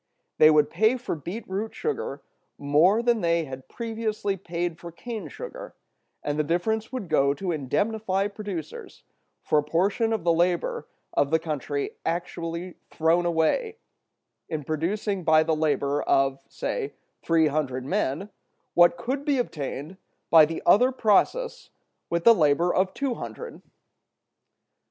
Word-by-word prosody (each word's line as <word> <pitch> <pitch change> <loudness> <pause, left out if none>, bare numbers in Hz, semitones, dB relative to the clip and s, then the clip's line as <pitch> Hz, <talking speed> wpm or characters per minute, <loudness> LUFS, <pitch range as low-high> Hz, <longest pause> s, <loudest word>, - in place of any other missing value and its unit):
They 155 - +8
would 150 -1 +4
pay 220 +4 +3
for 245 - -4
beet 175 +8 -6
root 200 +4 -4
sugar 450 -1 -3 0.3
more 160 +10 +3
than 235 -2 +2
they 170 -1 +1
had 130 -1 -9
previously 220 -3 -3
paid 175 -2 -4
for 170 - -9
cane 225 +5 -6
sugar, - - -9 0.5
and 145 +1 -2
the - - +3
difference 215 +9 -1
would 255 -8 -4
go 140 -2 +2
to 185 +3 -3
indemnify 195 - -1
producers 200 -6 -7 0.4
for 150 - +3
a - - -1
portion 195 +9 +1
of 220 -6 -1
the 170 -1 +3
labor 175 +1 0 0.3
of 140 - +2
the 160 - +4
country 150 -3 -4
actually 170 0 -4
thrown 165 +2 +2
away, 175 - +1 0.7
in 155 -3 -3
producing 185 +6 -2
by 155 -1 +5
the 160 0 +1
labor 145 -2 0
of 135 0 +1
(say) 430 -4 -4 0.3
three 165 -1 +3
hundred 140 -4 -1
men 190 +2 -1 0.4
what 175 0 +5
could 265 +9 -3
be 285 -2 +1
obtained 155 - -4 0.3
by 160 -2 +9
the 165 - -5
other 245 +9 +5
process 260 - +1 0.4
with 170 0 -1
the 230 - +8
labor 165 -1 +2
of 185 0 +1
two 275 -3 -1
hundred. 475 - -8
175 Hz, 145 wpm, -26 LUFS, 155-215 Hz, 0.7 s, by